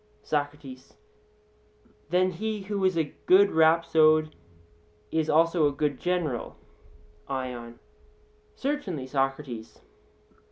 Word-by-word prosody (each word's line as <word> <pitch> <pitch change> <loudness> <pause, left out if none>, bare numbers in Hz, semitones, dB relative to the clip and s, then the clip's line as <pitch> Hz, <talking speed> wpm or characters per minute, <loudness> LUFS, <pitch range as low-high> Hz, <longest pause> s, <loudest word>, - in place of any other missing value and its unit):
SOCRATES: 145 -3 -4 1.1
Then 185 +1 +2
he 215 +4 -4
who 200 0 -3
is 185 -2 +2
a 155 -3 -1
good 200 +2 +6
rhapsode 160 -1 +4 0.8
is 160 -1 0
also 165 0 +3
a - - 0
good 145 -1 -2
general? 175 -9 -2 0.7
ION: 125 -3 -5 0.8
Certainly, 270 - -3
Socrates. 135 -3 -3
155 Hz, 90 wpm, -27 LUFS, 135-180 Hz, 1.1 s, good